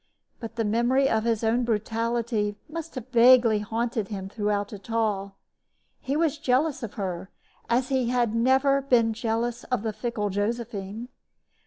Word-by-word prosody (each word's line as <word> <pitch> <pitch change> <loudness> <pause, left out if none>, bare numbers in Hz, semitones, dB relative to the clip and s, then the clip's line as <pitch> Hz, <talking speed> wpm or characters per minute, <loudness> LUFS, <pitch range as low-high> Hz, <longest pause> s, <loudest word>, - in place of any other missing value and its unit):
But 230 -1 -7
the 225 -1 -1
memory 240 +5 +2
of 220 -3 +1
his 230 -1 0
own 230 +3 +2
brutality 225 -1 -1
must 330 0 -7
have 255 -1 -7
vaguely 240 -2 +6
haunted 225 0 -2
him 195 -2 -6
throughout 205 -1 -2
it 205 +2 -11
all. 205 -4 -1 0.6
He 275 +3 -2
was 315 -2 +1
jealous 285 +2 +1
of 230 -4 -6
her 185 -2 -4 0.4
as 245 +2 +1
he 260 -3 +1
had 240 -3 +1
never 265 +4 +3
been 235 -4 +3
jealous 230 +1 -2
of 250 -5 -1
the 220 -1 -2
fickle 210 -3 -3
Josephine. 215 +1 -3
230 Hz, 155 wpm, -26 LUFS, 210-250 Hz, 0.6 s, vaguely